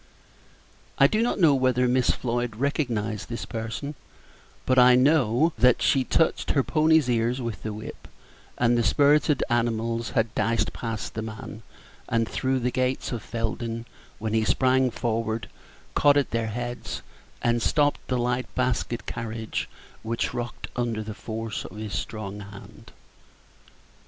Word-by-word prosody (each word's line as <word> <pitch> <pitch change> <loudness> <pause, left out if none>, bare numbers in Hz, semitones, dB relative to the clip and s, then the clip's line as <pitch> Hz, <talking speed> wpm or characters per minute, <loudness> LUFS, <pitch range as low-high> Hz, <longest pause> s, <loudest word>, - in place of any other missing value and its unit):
I - - +7
do 215 0 +3
not 235 - 0
know 160 -5 +6
whether 130 -1 +2
Miss 125 0 +2
Floyd 120 -2 -1
recognized 115 -6 -1
this 115 - -4
person; 115 +6 -5 0.7
but 130 0 +4
I 125 0 +8
know 135 +2 +3
that 125 +1 +5
she 135 - +3
touched 165 +5 +1
her 140 - +3
ponies' 155 -2 +3
ears 120 +1 +1
with 115 -4 -4
the 110 - -4
whip, 105 +1 -8 0.5
and 120 0 +3
the 120 - +3
spirited 145 +5 +3
animals 115 -1 0
had 110 -1 +1
dashed 115 0 0
past 115 -2 -4
the 110 - -3
man, 110 0 -7 0.5
and 115 -1 +1
through 130 +2 -1
the 125 +1 0
gates 130 0 -1
of 120 -3 -3
Felden, 115 0 -3 0.3
when 110 0 -3
he 110 0 +3
sprang 130 +3 +3
forward, 115 -4 -2 0.5
caught 145 0 +5
at 140 - +1
their 115 -1 0
heads, 120 +2 -5 0.4
and 120 0 +2
stopped 145 +8 +2
the 130 - 0
light 125 +1 0
basket 125 -2 -1
carriage, 115 -1 -4 0.3
which 115 +1 -2
rocked 120 0 -5
under 115 -3 -1
the 110 0 -6
force 110 0 -5
of - - -10
his 105 -1 -5
strong 105 -2 -4
hand. 100 0 -12
120 Hz, 150 wpm, -26 LUFS, 110-130 Hz, 0.7 s, I